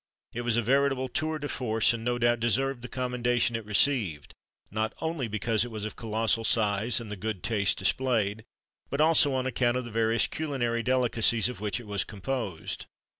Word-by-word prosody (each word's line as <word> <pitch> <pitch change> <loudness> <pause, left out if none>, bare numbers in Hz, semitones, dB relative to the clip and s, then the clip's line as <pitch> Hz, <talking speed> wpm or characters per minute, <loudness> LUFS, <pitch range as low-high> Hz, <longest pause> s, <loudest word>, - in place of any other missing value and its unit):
It 120 - -3
was 120 -1 0
a 120 - +2
veritable 135 +1 +2
tour 155 +5 -1
de 145 -1 -4
force, 115 -3 +1
and, 115 -1 -5
no 120 +1 0
doubt 120 0 +2
deserved 130 +2 0
the 125 - -6
commendation 125 -1 0
it 115 - -3
received, 105 - +1 0.4
not 110 +2 -1
only 160 -6 -2
because 110 0 0
it 120 - -5
was 110 -2 -5
of 110 - -6
colossal 115 0 0
size, 110 0 +2
and 115 -3 -8
the - - -3
good 100 -1 -4
taste 105 -3 +1
displayed, 110 0 0 0.5
but 140 - -3
also 155 -2 +5
on 130 -1 -1
account 125 -1 +1
of 125 - -3
the 120 - -8
various 115 +1 +2
culinary 125 -7 -2
delicacies 120 -2 +2
of 125 - -8
which 105 0 -2
it 120 - -10
was 100 -2 -1
composed. 105 -4 -4
120 Hz, 190 wpm, -28 LUFS, 110-130 Hz, 0.5 s, also